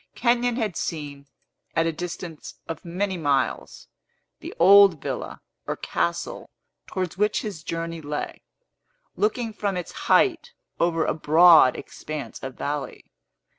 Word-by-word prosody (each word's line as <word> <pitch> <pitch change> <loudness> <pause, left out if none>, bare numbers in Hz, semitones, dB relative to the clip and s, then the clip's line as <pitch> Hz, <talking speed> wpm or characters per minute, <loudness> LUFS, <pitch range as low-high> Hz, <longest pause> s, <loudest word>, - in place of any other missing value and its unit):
Kenyon 240 0 +2
had 220 -8 -2
seen, 145 -3 -5 0.5
at 165 - +2
a 165 - +1
distance 165 -1 -7
of 165 - -6
many 185 +2 -2
miles, 140 -5 -1 0.5
the - - -8
old 195 -1 +7
villa - - -5 0.3
or - - -1
castle - - -3 0.4
towards 185 -1 -4
which 210 +1 +1
his 200 -7 -6
journey 165 0 -4
lay, 150 0 -5 0.7
looking 220 +2 -1
from 200 -2 -2
its 175 - -5 0.2
height 400 +6 +3 0.3
over 165 -2 +1
a - - +1
broad 160 -2 +6
expanse 155 -2 -7
of 130 -1 -6
valley. 145 0 -4
170 Hz, 130 wpm, -24 LUFS, 155-200 Hz, 0.7 s, old